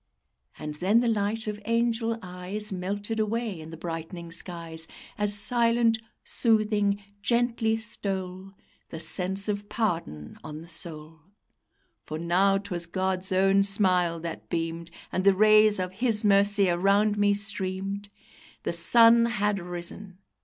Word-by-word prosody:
And 150 -1 -6
then 185 +8 +1
the 240 - 0
light 215 0 -1
of 210 -1 -5
angel 230 0 0
eyes 185 +4 -4
Melted 200 +4 -4
away 215 -3 -2
in 155 0 -10
the 165 - -9
brightening 165 +1 -6
skies, 165 -1 -4 0.3
As 205 0 +1
silent, 230 +1 +2 0.2
soothing, 210 -3 +1 0.2
gently 235 -1 +1
stole 195 -3 -5 0.4
The 160 - -7
sense 190 +4 +1
of 205 0 -3
pardon 165 - -3
on 150 0 -7
the 165 - -12
soul, 160 -2 -3 0.9
For 155 - -4
now 185 +4 +2
'twas 180 -4 -3
God's 190 +1 -1
own 195 +1 +3
smile 185 -4 +3
that 165 -1 -7
beamed, 165 0 -3 0.2
And 185 - -1
the 195 0 +5
rays 215 +1 +5
of 185 -1 -3
His 220 +1 +1
mercy 200 0 +4
around 200 +4 +2
me 205 0 +2
streamed; 200 -1 -2 0.5
The - - -2
SUN 230 +7 +5
had 210 -3 0
risen! 180 +2 -6
195 Hz, 135 wpm, -26 LUFS, 175-215 Hz, 0.9 s, the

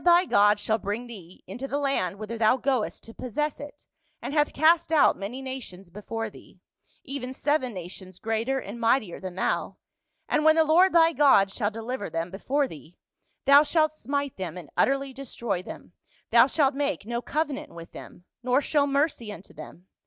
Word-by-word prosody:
123 350 +1 +4
thy - - +6
God 205 +1 +5
shall 220 +2 0
bring 210 +5 -4
thcc 190 -7 -12
into 245 +9 -6
the 280 - -2
land 270 -10 -1
whither 215 +2 -6
thou 225 +2 +3
goest 260 -3 -1
to 225 - -12
possess 290 +6 -3
it, 290 0 -11 0.3
and - - -6
hath 295 -1 +2
cast 325 +2 +3
out 310 -3 +5
many 235 +7 -6
nations 205 -9 -8
before 225 +3 -5
thee 200 - -15 0.2
— - - -45 0.2
even 260 -2 -5
seven 275 -1 0
nations 185 -1 -9
greater 225 +5 -1
and 230 -2 -6
mightier 230 -5 +1
than 185 -2 -7
thou, 190 - -1 0.5
and 300 - +1
when 315 0 +6
the 325 - +5
Lord 345 +5 +5
thy 330 -1 +5
God 265 -10 +5
shall 205 0 -1
deliver 225 -1 -5
them 165 +2 -3
before 270 +9 0
thee: 160 - -13 0.5
thou 280 +1 +8
shalt 310 0 +2
smite 285 -1 -3
them 185 -3 -5
and 165 -6 -10
utterly 275 0 +1
destroy 235 -7 -4
them; - - -11 0.4
thou - - +7
shalt 285 -3 +2
make 285 -5 -2
no 235 +1 -3
covenant 295 0 -3
with 170 0 -11
them; - - -12 0.2
nor 250 +2 +2
show 290 0 +1
mercy 280 -6 0
unto 195 -1 -12
them. 180 - -12
250 Hz, 190 wpm, -26 LUFS, 205-285 Hz, 0.5 s, thou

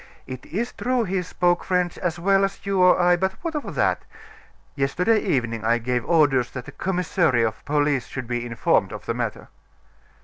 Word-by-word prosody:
It 130 -1 -8
is 230 +8 -3
true 250 -1 0
he 190 -2 -1
spoke 175 0 0
French 180 -2 0
as 175 -2 -2
well 195 +3 +3
as 195 +1 -3
you 195 -1 +1
or 180 0 +6
I; 175 0 +4
but 190 +2 -1
what 335 -2 -3
of 300 -2 -5
that? - - +1 0.7
Yesterday 180 +11 +1
evening 115 - -1
I 115 +1 +3
gave 120 +1 -1
orders 145 -7 +3
that 125 -2 -6
the - - -9
commissary 175 -8 +1
of 110 -2 -2
police 145 -3 +1
should 130 -2 -6
be 120 0 -3
informed 115 -1 +1
of - - -8
the - - -1
matter." - - -4
175 Hz, 190 wpm, -23 LUFS, 125-190 Hz, 0.7 s, or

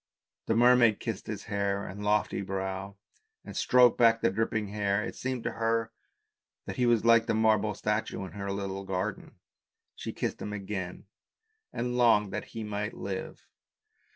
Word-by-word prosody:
The 110 - +2
mermaid 120 -2 +5
kissed 115 -5 -5
his 105 -2 -5
fair 100 0 -1
and 100 +2 -7
lofty 105 -1 +1
brow, 95 0 -4 0.5
and - - -9
stroked 125 -2 +5
back 115 -1 +5
the - - +3
dripping 110 0 -1
hair; 100 0 0
it - - -5
seemed 130 -2 -3
to - - -1
her 115 0 0 0.7
that - - -6
he 125 - +2
was 115 -2 +3
like 115 -1 +5
the - - +1
marble 110 -1 +2
statue 105 -1 -2
in 95 - -9
her 100 -1 -4
little 100 0 -4
garden, 95 -1 -4 0.6
she - - -6
kissed - - -3
him 105 - -4
again 95 -3 -5 0.7
and 125 +1 -2
longed 105 -5 +4
that 105 - -3
he 115 -1 -7
might 105 0 -3
live. 95 -1 -6
105 Hz, 165 wpm, -29 LUFS, 100-115 Hz, 0.7 s, mermaid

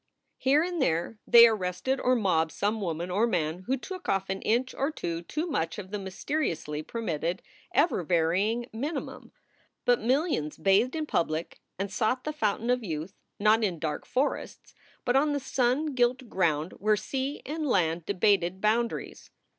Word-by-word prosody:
Here 280 +4 +4
and 350 -2 -2
there 175 0 0
they 235 0 +10
arrested 215 +5 -1
or 255 0 +3
mobbed 165 -8 +1
some 210 +2 -1
woman 170 -1 -3
or 210 +6 +2
man 175 -2 -1
who 265 +2 +1
took 370 +6 -7
off 195 0 0
an 190 - -3
inch 245 +4 +1
or 275 - 0
two 170 - -4
too 305 - -3
much 210 - -2
of 195 -2 -8
the 210 - -3
mysteri 235 +11 -2
ously 150 -2 -4
permitted, 170 -3 -3 0.3
ever 340 - +2
varying 185 +8 +1
minimum. 285 +8 -5 0.5
But 245 0 +3
millions 250 - 0
bathed 195 - +3
in 315 -1 -1
public 165 - -2 0.2
and 195 +1 -3
sought 225 +4 0
the 305 - -3
fountain 230 -3 0
of 250 -1 +1
youth 165 0 -4 0.2
not 215 +2 +4
in 185 -5 0
dark 155 -1 -4
forests, 265 +3 -2 0.3
but 245 -1 +2
on 290 +2 +3
the 285 - 0
sun 270 +3 0
gilt 250 0 +1
ground 165 -4 0
where 215 +1 +3
sea 270 +6 -3
and 305 +1 -3
land 170 - +1
debated 190 -2 +2
boundaries. 225 +3 -1
215 Hz, 170 wpm, -28 LUFS, 175-260 Hz, 0.5 s, they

